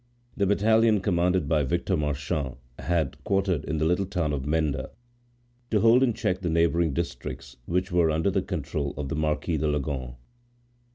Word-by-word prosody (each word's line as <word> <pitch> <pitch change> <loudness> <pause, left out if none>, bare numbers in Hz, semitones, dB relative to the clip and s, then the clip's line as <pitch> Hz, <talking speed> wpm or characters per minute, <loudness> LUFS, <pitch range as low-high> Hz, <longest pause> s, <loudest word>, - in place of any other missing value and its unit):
the 100 - +1
battalion 110 +2 +4
commanded 90 -3 +1
by 75 0 +2
Victor 85 +7 0
Marchand 75 -2 -2 0.2
was 85 -1 +1 0.2
quartered 95 -6 0
in 80 - -2
the 80 - +1
little 90 +3 +1
town 85 -6 -1
of 70 -1 -3
Menda, 75 -4 0 0.8
to 105 - +2
hold 115 +3 +6
in 130 -2 +4
check 90 0 -1
the 90 - -1
neighboring 85 0 +2
districts, 60 -2 -5
which 90 +2 -1
were 85 -2 +3
under 80 +5 +1
the 95 0 +1
control 75 -6 -3
of 70 -1 -4
the 80 - -2
Marquis 75 +1 0
de 75 +1 0
Leganes. 70 -4 -2
80 Hz, 170 wpm, -26 LUFS, 75-95 Hz, 0.8 s, hold